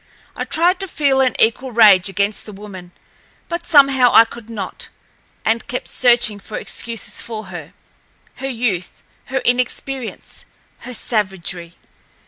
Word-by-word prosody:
I - - -3
tried 350 +3 +2
to 385 - -4
feel 280 -5 +2
an 255 -2 +2
equal 250 +4 +2
rage 205 -5 +6
against 200 +3 -1
the - - -7
woman, 195 -3 -10 0.6
but 340 0 -4
somehow 275 -5 +6
I 230 - +8
could 230 0 -12
not, 205 -5 -5 0.6
and 225 +1 +1
kept 250 - -4
searching 240 -4 +2
for 210 - -7
excuses 230 -3 -4
for 220 -2 -6
her—her 175 - -11
youth, 225 -8 -2 0.2
her 265 0 -2
inexperience, 250 +1 -2 0.4
her 250 0 -8
savagery. 185 -6 -2
230 Hz, 130 wpm, -19 LUFS, 200-260 Hz, 0.6 s, I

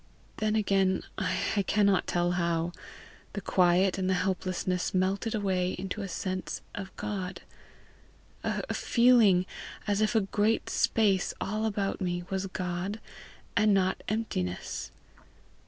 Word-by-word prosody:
Then 215 -1 +1
again, 195 -3 +2 0.2
I 205 - 0
cannot 200 -2 +3
tell 175 0 +1
how, 170 -1 0 0.6
the 205 - -3
quiet 185 +1 +3
and 185 0 0
the 190 - +3
helplessness 185 -1 -1
melted 195 +5 +1
away 185 -3 0
into 190 +3 -4
a 195 - -3
sense 185 +1 -3
of 195 -2 -5
God 195 -3 -4 1.0
a - - -2
feeling 235 -7 +5 0.4
as 205 0 +1
if 215 +2 +2 0.2
great 215 +2 +1
space 200 -5 +2
all 215 +2 -1
about 200 -2 -2
me 175 -1 -1
was 195 0 -1
God 185 +3 -3 0.6
and 215 -2 +4
not 190 -1 +1
emptiness. 145 - -3
190 Hz, 120 wpm, -29 LUFS, 180-210 Hz, 1.0 s, feeling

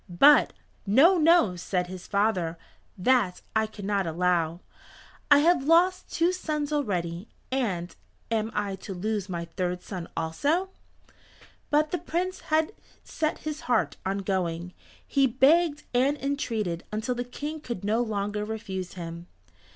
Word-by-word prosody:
But, 280 +13 +6 0.3
"No, 315 - +6
no," 315 - +5
said 180 +1 -1
his 180 0 -9
father, 195 -5 0 0.4
"that 205 -2 +2
I 220 0 +2
cannot 200 -3 -2
allow. 170 0 0 0.7
I 290 - +8
have 340 -6 +3
lost 360 +4 +3
two 335 +2 +2
sons 305 -4 -2
already, 180 - -2 0.2
and 195 -10 -1 0.4
am 220 -1 0
I 200 -2 -1
to 195 0 -7
lose 205 +1 -2
my 170 -2 -3
third 180 +1 -3
son 180 -4 -6
also?" 285 - 0 1.0
But 300 +1 +2
the 355 - -1
Prince 355 +3 -2
had 315 +5 +2 0.3
set 310 -1 -2
his 305 0 -4
heart 245 - +1
on 195 +1 -2
going. 180 -2 -2 0.3
He 275 -1 +3
begged 295 +5 +3
and 265 +4 +2
entreated 225 - -2
until 220 +4 -1
the 245 0 -3
King 295 +5 -6
could 235 -9 -5
no 215 +3 +1
longer 210 -2 -2
refuse 210 -4 -5
him. 170 -1 -7
215 Hz, 140 wpm, -27 LUFS, 180-290 Hz, 1.0 s, I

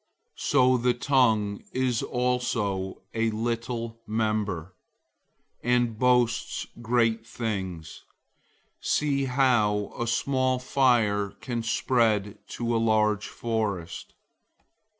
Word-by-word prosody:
003:005 - - -12
So 130 0 +4
the 125 0 +2
tongue 115 -6 +2
is 130 -3 0
also 115 -6 -1
a 115 0 +1
little 115 +1 -3
member, 105 -5 -1 0.9
and 120 -2 +1
boasts 125 -2 +2 0.2
great 115 -1 +1
things. 95 -9 -5 0.8
See 140 -2 +1
how 120 -6 +2
a 120 - -3
small 130 +2 +1
fire 120 -6 +2
can 120 -3 -3
spread 110 -3 +1
to 120 0 -2
a 115 - +2
large 110 -2 +2
forest! 105 -7 -3
115 Hz, 95 wpm, -27 LUFS, 105-125 Hz, 0.9 s, So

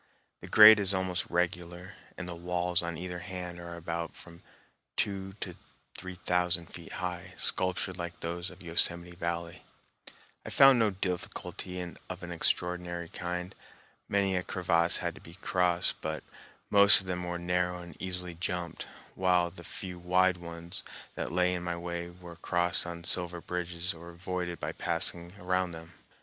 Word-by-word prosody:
The - - -10
grade 110 0 +10
is 100 -1 +4
almost 95 -1 -1
regular, 90 +1 -2 0.2
and 90 - -5
the 90 - -5
walls 90 0 0
on 85 -1 -4
either 90 +1 -5
hand 90 -1 -6
are 85 0 -7
about 85 0 -4
from 85 0 -13 0.6
two 95 -1 -1
to 90 -3 -4 0.4
three 95 0 -7
thousand 90 -1 +2
feet 85 -1 -9
high, 90 0 -5
sculptured 95 0 +3
like 85 0 -5
those 85 +2 -4
of 90 +1 -14
Yosemite 85 +1 0
Valley. 85 0 -4 0.8
I - - -7
found 135 -2 +7
no 110 -2 +4
difficulty 90 -1 -4 0.3
of 95 -1 -6
an 90 - -6
extraordinary 85 0 +1
kind. 90 +2 -4 0.6
Many 100 -1 +2
a 90 - +1
crevasse 85 -2 +2
had - - -2
to - - -14
be 85 - -13
crossed, 90 -3 0
but 80 -1 -3 0.5
most 100 -1 +9
of - - -11
them 90 -1 -3
were 90 0 -3
narrow 90 0 0
and 85 -3 -11
easily 90 -1 +1
jumped, 90 0 -4 0.3
while 90 -2 +2
the 85 0 -12
few 90 0 -6
wide 90 +1 +3
ones 85 0 -7 0.3
that - - -4
lay 90 0 +2
in 90 - -2
my 85 -1 -3
way 85 0 -4
were 85 -1 -12
crossed 90 0 +2
on 85 0 -6
sliver 90 0 0
bridges 90 0 -3
or 85 +1 -11
avoided 90 0 -4
by - - -3
passing 85 +1 -1
around 90 -1 0
them. 80 0 -10
90 Hz, 160 wpm, -30 LUFS, 85-90 Hz, 0.8 s, grade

